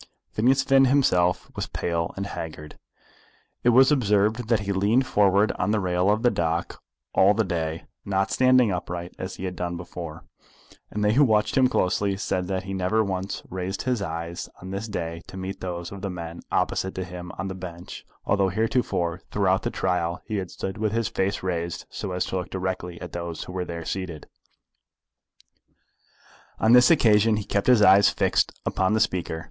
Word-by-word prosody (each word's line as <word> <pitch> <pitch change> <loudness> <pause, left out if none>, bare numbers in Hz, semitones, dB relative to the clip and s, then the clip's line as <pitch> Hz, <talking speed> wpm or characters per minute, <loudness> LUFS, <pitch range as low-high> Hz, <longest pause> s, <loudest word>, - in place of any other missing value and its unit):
Phineas 130 +5 +2
himself 135 -10 +3
was - - -3
pale 85 -1 -2
and 100 - -2
haggard. 75 -5 -7 0.8
It 120 - +5
was 130 +4 +6
observed 110 -3 +2
that 115 -3 +3
he 100 0 -2
leaned 105 +7 +2
forward 100 -1 +3
on - - 0
the 110 0 +2
rail 90 0 +1
of 105 +3 +1
the 120 - +4
dock 85 0 -2 0.3
all 100 +2 +5
the 110 - +2
day, 80 -3 -3 0.2
not 95 -1 0
standing 130 -3 +4
upright 90 -1 -4
as 95 +1 -5
he 95 - -6
had 90 -1 -4
done 85 0 -3
before; 85 -2 -8 0.6
and 105 0 -2
they 105 - +3
who 145 +5 +5
watched 105 -4 +2
him 130 -1 +5
closely 100 -4 0
said 90 -2 -2
that 95 -1 -2
he 95 +1 -5
never 95 +4 +1
once 95 -1 -3
raised 95 +1 -4
his 125 -4 0
eyes 85 -1 -5
on 95 +1 -8
this 100 +3 -4
day 85 -5 -4
to 95 - -9
meet 95 +1 -6
those 85 -1 -5
of 100 -1 -8
the 100 - -3
men 85 -2 -7
opposite 95 - 0
to 95 - -3
him 90 -1 -8
on 95 - -3
the 95 - -4
bench, 90 -1 -8 0.2
although 100 -1 +2
heretofore 95 -5 0
throughout 95 -2 +2
the - - -2
trial 90 -2 -1
he 110 -2 -3
had 95 -3 -3
stood 95 +2 -5
with 110 -1 0
his 115 -2 0
face 95 +1 -1
raised 85 -2 -3
so 95 - -5
as 90 0 -1
to 95 - -3
look 90 -1 -4
directly 90 -2 -4
at 90 -2 -7
those 85 -1 -5
who 90 - -9
were 90 -1 -2
there 85 -1 -6
seated. 90 -5 -5 2.3
On 110 +2 +4
this 125 0 +7
occasion 110 -7 +4
he 105 - -2
kept 100 -1 -1
his 125 -4 +6
eyes 100 +1 +7
fixed - - 0
upon 95 +2 +1
the 110 - +2
speaker. 90 -6 -1
95 Hz, 190 wpm, -25 LUFS, 90-105 Hz, 2.3 s, this